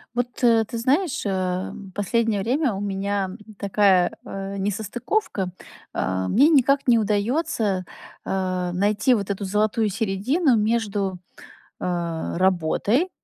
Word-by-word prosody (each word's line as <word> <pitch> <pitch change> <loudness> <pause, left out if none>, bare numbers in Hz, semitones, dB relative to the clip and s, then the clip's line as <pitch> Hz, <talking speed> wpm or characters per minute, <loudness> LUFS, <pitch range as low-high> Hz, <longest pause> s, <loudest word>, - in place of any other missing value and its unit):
Вот, 245 +1 -3
э, 230 -2 +5
ты 235 - -5
знаешь, 275 +6 0
э, 185 -2 -1 0.2
последнее 215 0 0
время 255 +4 +1
у 195 - -4
меня 200 -1 -1 0.3
такая, 195 -3 +3
э, 195 0 -5
несостыковка. 205 - -2 0.4
Э, 95 0 -1
мне 275 +9 +5
никак 275 -2 +3
не 235 -2 +5
удаётся, 210 - 0 0.4
э, 185 -2 -1
найти 210 +7 +2
вот 205 -4 -1
эту 200 0 -2
золотую 215 +3 +1
середину 225 - +1
между, 210 -3 0 0.6
э, 170 -2 -2
работой, 190 - +2
205 Hz, 120 wpm, -23 LUFS, 190-235 Hz, 0.6 s, э